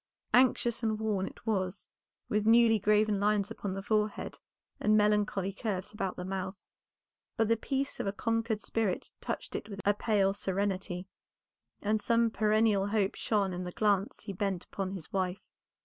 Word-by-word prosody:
Anxious 245 -2 +4
and 220 -2 0
worn 210 -3 0
it - - -12
was, 195 -3 -1 0.4
with 210 0 0
newly 225 -1 +6
graven 210 0 +3
lines 205 0 +1
upon 200 -4 -4
the 195 - -5
forehead 210 0 -1 0.4
and 215 0 +4
melancholy 210 -2 +2
curves 200 -2 -3
about 195 -3 -2
the 180 - -5
mouth, 190 0 -4 0.8
but 225 - +3
the 230 - +5
peace 270 +4 -2
of - - -2
a - - +1
conquered 225 +1 -1
spirit 220 -5 -2
touched - - -4
it - - -4
with 200 -2 -7
a 205 - +5
pale 205 -2 +2
serenity, 190 -2 -2 0.8
and 210 +1 +1
some 230 0 +3
perennial 215 -2 +3
hope 205 -2 +1
shone 200 -4 0
in 180 +1 -4
the 180 - -5
glance 205 0 +1
he 205 -2 -5
bent 190 -2 -2
upon 195 -1 -4
his 190 -5 -7
wife. 185 -1 -1
205 Hz, 165 wpm, -31 LUFS, 195-220 Hz, 0.8 s, newly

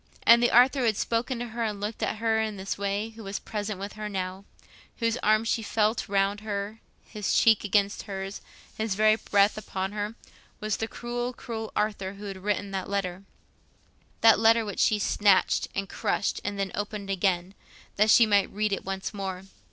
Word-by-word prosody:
And 235 +1 +7
the 240 - +4
Arthur 255 +3 +5
who 250 - +1
had 220 -3 +2
spoken 235 +2 -1
to 240 0 -5
her 230 +1 -3
and 210 -2 -2
looked 210 +2 -4
at - - 0
her 220 0 +1
in 215 -2 -3
this 190 +1 -3
way, 200 +2 -2
who 225 0 -12
was 195 0 -4
present 210 -2 -4
with 200 +1 -6
her 215 0 -5
now—whose 195 +4 -5
arm 215 -1 +3
she 230 0 0
felt 220 0 0
round 200 +1 +1
her, 210 0 -4 0.3
his 210 -2 -1
cheek 225 -2 +5
against 200 0 +1
hers, 195 0 -5 0.3
his 220 -3 -2
very 215 +1 +5
breath 205 -1 +2
upon 190 -2 -4
her—was 210 0 -6
the 225 - -2
cruel, 240 +2 -4
cruel 225 -2 -6
Arthur 200 -2 -1
who 200 +1 -10
had 195 -1 -5
written 205 +1 -2
that 190 -1 -4
letter, 195 -1 -3 1.0
that 225 -2 +7
letter 225 0 +4
which 205 -3 -5
she 215 - +4
snatched 205 -2 +3
and 195 0 -2
crushed 200 - -1
and 205 0 -3
then 195 -2 -2
opened 205 -1 -4
again, 185 -1 0 0.4
that 210 +2 +4
she 230 - +7
might 205 -2 +3
read 210 0 0
it 195 - -3
once 195 +1 -4
more. 190 -2 -5
210 Hz, 190 wpm, -27 LUFS, 195-220 Hz, 1.0 s, And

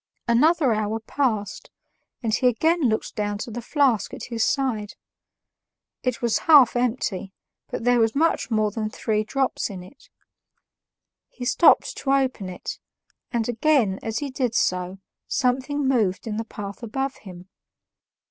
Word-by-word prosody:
Another 275 +2 +4
hour 215 +1 -1
passed, 220 -3 -2 0.5
and 220 -2 0
he 250 - +3
again 320 +8 +2
looked 220 - -2
down 205 -1 -2
to 230 - -6
the 240 +2 -5
flask 265 -4 +1
at - - -9
his 225 -1 +1
side; 240 -7 -1 1.1
it 250 -1 -2
was 235 -2 +2
half 280 -7 +8
empty, 230 -6 -1 0.4
but - - -4
there 245 0 +3
was 225 +1 +2
much 325 +3 +1
more 215 -2 +1
than 215 0 -3
three 215 0 -1
drops 265 +4 -1
in 185 -3 -8
it. 260 +9 -17 1.2
He 245 - -8
stopped 260 +7 +4
to 275 - 0
open 260 -8 0
it, 180 - -7 0.5
and 235 -4 -1
again, 240 -5 +2
as 225 0 -3
he 285 +1 -3
did 250 -3 -1
so, 180 +1 0 0.3
something 265 +2 0
moved 215 -8 +1
in 215 -2 -3
the 225 - -3
path 200 -1 -8
above 270 +4 -3
him. 180 -2 -12
230 Hz, 150 wpm, -24 LUFS, 210-265 Hz, 1.2 s, half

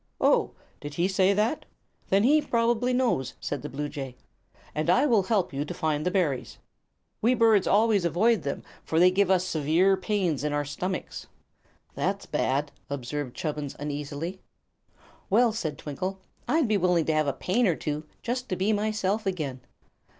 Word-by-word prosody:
"Oh; - - +3 0.3
did 145 0 -7
he 175 +2 +2
say 190 0 +3
that? 220 +9 0 0.5
Then 195 +2 +4
he 300 +5 +5
probably 235 0 +1
knows," 245 - 0
said 145 - -4
the - - -6
bluejay, 140 -2 -5 0.6
"and 155 +2 -1
I 255 +11 +5
will 230 -8 +4
help 190 -4 0
you 140 +1 -1
to 150 - -6
find 155 -1 -1
the 180 - +1
berries. 170 -9 -1 0.6
We 240 +4 +3
birds 225 -4 +4
always 210 -2 +3
avoid 205 +7 +2
them, 140 - -4 0.2
for 160 - 0
they 180 +1 +6
give 195 0 +2
us 185 -1 +3
severe 170 +3 +2
pains 190 - -1
in 150 -1 -1
our 145 0 0
stomachs." 180 +6 -4 0.7
"That's - - -2
bad," 140 +2 0 0.2
observed 140 -1 -4
Chubbins, 150 -3 -4
uneasily. 150 +5 -5 0.9
"Well," 230 +3 +4
said 160 -10 -3
Twinkle, 185 +7 -4 0.3
"I'd 315 -4 +2
be 215 -1 +2
willing 180 -3 +2
to 160 - +1
have 155 -1 +1
a - - +2
pain 220 - +1
or 175 - +2
two, 150 0 -3 0.2
just 250 +2 -3
to 185 - 0
be 195 +4 +1
myself 215 0 0
again." 145 -9 -3
180 Hz, 170 wpm, -27 LUFS, 150-215 Hz, 0.9 s, they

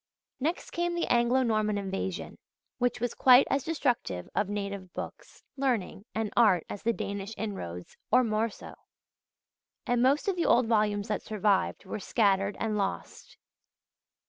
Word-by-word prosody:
Next 320 +7 -2
came 345 0 -1
the 345 - 0
Anglo 240 +2 +3
Norman 215 -3 +1
Invasion, 195 -2 -4 0.4
which 245 0 +1
was 240 0 -1
quite 255 0 +7
as 275 -1 +1
destructive 245 - -1
of 200 - 0
native 200 -2 -4
books, - - -8
learning, 240 -7 -1
and 220 -1 -2
art 205 -8 +4
as 205 - -6
the 230 - +2
Danish 200 -1 -5
inroads, 90 - -6 0.2
or 250 +3 +6
more 220 0 0
so; - - -11 1.1
and 245 -1 +1
most 275 +7 +3
of 390 - +1
the 345 - 0
old 245 +1 +5
volumes 210 -2 +1
that 210 - -1
survived 205 -2 0
were 190 - -5
scattered 200 -1 +1
and 215 -2 -1
lost. 195 -1 -4
215 Hz, 150 wpm, -29 LUFS, 200-245 Hz, 1.1 s, quite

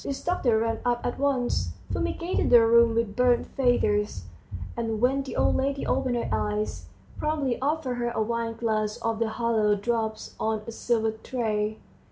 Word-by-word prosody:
This 275 - -4
doctor 260 -10 +2
ran 225 0 0
up 240 -1 0
at 245 - -2
once, 245 - 0 0.2
fumigated 90 - -1
the 235 -2 +7
room 230 0 +5
with 230 -3 0
burnt 250 -1 +3
feathers, 210 - +1 0.5
and 225 -2 -2
when 260 +4 +2
the 270 - -7
old - - +2
lady 275 +1 -1
opened 260 -2 0
her 235 - -1
eyes, 105 -4 -2 0.3
promptly 290 -6 -1
offered 280 -3 -1
her 240 0 -1
a 235 - -3
wineglass 225 -2 -1
of 225 -1 -2
the 230 -1 +1
hallowed 220 -3 +1
drops 220 -2 -2
on 220 -1 -1
a - - -6
silver 225 -1 0
tray. 220 -2 -2
230 Hz, 165 wpm, -26 LUFS, 215-245 Hz, 0.5 s, the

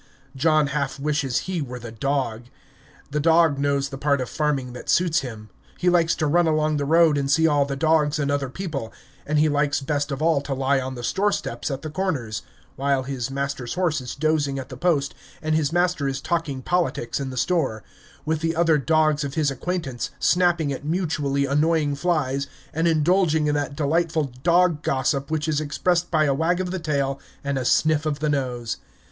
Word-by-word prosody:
John 155 +2 +3
half 140 -2 -2
wishes 145 -3 0
he 185 -3 -2
were 125 -3 -5
the 120 -1 -8
dog. 120 -1 -2 0.7
The 150 - 0
dog 160 -2 +4
knows 140 -1 0
the 135 - -7
part 140 0 +2
of 125 - -4
farming 140 -5 -1
that 125 - -9
suits 175 -2 +3
him. 110 -4 -8 0.3
He 180 0 +2
likes 170 -1 +3
to 155 - -1
run 170 +3 +3
along 155 -1 +1
the 145 - -1
road 160 -1 +4
and 135 -1 -2
see 160 +3 +4
all 145 -3 +3
the 140 0 -3
dogs 155 0 +2
and 140 -1 0
other 140 -2 -1
people, 140 -8 -5 0.4
and 150 +1 +1
he 155 +1 +4
likes 145 -1 +1
best 145 +1 -2
of 135 - -3
all 160 -2 +2
to 140 -1 -3
lie 135 +1 +1
on 130 0 -4
the 120 - -7
store 200 - +1
steps - - -3
at 135 +1 -4
the 155 - -5
Corners 150 - -2 0.4
while 140 -1 +1
his 130 -3 -4
master's 135 -2 -3
horse 175 -6 0
is 125 - -6
dozing 150 -2 0
at 130 - -6
the 130 - -7
post 140 -1 +1 0.3
and 155 0 -1
his 155 -2 +1
master 175 -4 +1
is 135 0 -2
talking 145 -3 -2
politics 170 -9 -1
in 135 -1 -3
the 130 - -7
store 135 -8 0 0.4
with 160 0 0
the 165 +1 -1
other 165 -2 +3
dogs 155 0 +2
of 140 -1 -4
his 150 -3 +1
acquaintance, 135 -4 -3
snapping 175 -5 +2
at 135 - -7
mutually 150 -4 0
annoying 150 +1 +2
flies, 140 -3 0 0.3
and 165 +2 +1
indulging 160 0 +3
in 150 - +1
that 145 -1 -2
delightful 155 -1 0
dog 170 -1 +3
gossip 135 0 0
which 155 0 -1
is 155 -1 +1
expressed 175 +4 0
by 155 -2 +3
a 140 -2 +2
wag 165 +5 +1
of 180 -1 -2
the 190 - -2
tail 140 -4 -1 0.2
and 140 -1 -1
a - - -2
sniff 155 +3 +2
of 150 -2 -1
the 150 +1 -1
nose. 125 -5 -2
150 Hz, 205 wpm, -23 LUFS, 135-160 Hz, 0.7 s, dog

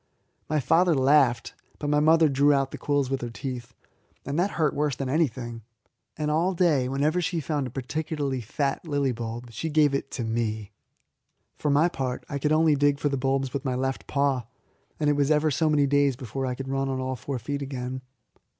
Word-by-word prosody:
My 155 - +2
father 165 +4 +3
laughed, 135 -2 +3 0.2
but 145 - -4
my 150 0 +3
mother 160 +1 +5
drew 140 +1 +3
out 135 -1 +1
the - - -7
quills 140 -2 0
with 135 - -1
her 120 - -4
teeth, 125 0 -6 0.5
and 140 +4 -2
that 190 +3 +2
hurt 155 -3 +2
worse 145 -2 0
than 135 -1 -3
anything; 125 -6 -1 0.6
and 150 0 -1
all 175 +5 +1
day, 150 -8 +2
whenever 150 +6 +1
she 170 0 -1
found 145 -2 -2
a - - -6
particularly 140 +1 -3
fat 140 - -2
lily 145 -3 +1
bulb, 120 0 -6
she 160 +9 -4
gave 150 -2 +3
it 140 0 -2
to 120 - -3
me. 110 -2 -2 0.8
For 150 - -2
my 145 +4 +4
part, 130 -7 -4
I 140 - -4
could 150 +2 0
only 155 -1 +4
dig 145 0 +2
for 145 - 0
the 140 - -1
bulbs 135 0 0
with 140 - -3
my 130 -3 -1
left 135 +1 -2
paw, 140 -4 0 0.5
and 150 - +1
it 145 - +4
was 140 0 +1
ever 155 0 +3
so 155 +3 +1
many 145 -2 +3
days 140 -1 +3
before 130 +1 -4
I 125 - -2
could 135 +1 -6
run 135 0 -1
on 130 -1 -2
all 130 0 -2
four 130 +2 -4
feet 140 +5 -4
again. 130 -1 -4
140 Hz, 210 wpm, -26 LUFS, 130-150 Hz, 0.8 s, mother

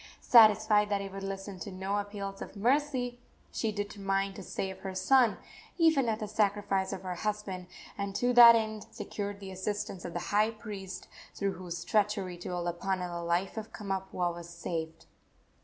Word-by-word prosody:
Satisfied 215 -2 +6
that 200 -1 +1
he 195 - -5
would 195 0 -7
listen 195 0 -5
to 195 - -6
no 190 +2 -2
appeals 200 -1 -5
for - - -7
mercy, 250 +1 +1 0.3
she 225 - -1
determined 195 -1 -2
to - - -7
save 190 -1 -4
her 190 -1 -6
son, 250 +2 +4 0.4
even 315 -8 +4
at 220 -1 -1
the 215 - -2
sacrifice 205 -2 +1
of 190 - -5
her 185 -1 -3
husband, 195 -1 -3 0.3
and 200 0 -3
to 245 +3 +2
that 235 -1 +10
end 220 -1 -2
secured 205 -1 -5
the 195 -1 -8
assistance 190 -1 -4
of 175 - -6
the 175 - -2
high 210 +1 +4
priest, 210 -4 -7 0.3
through 200 -1 0
whose 175 -2 -6
treachery 205 -3 +1
to 175 - -7
Olopana 180 +1 -2
the 170 0 -4
life 170 +5 -1
of 220 0 -5
Kamapuaa 190 -3 -2
was 170 0 -9
saved. 165 -2 -5
200 Hz, 175 wpm, -30 LUFS, 185-215 Hz, 0.4 s, that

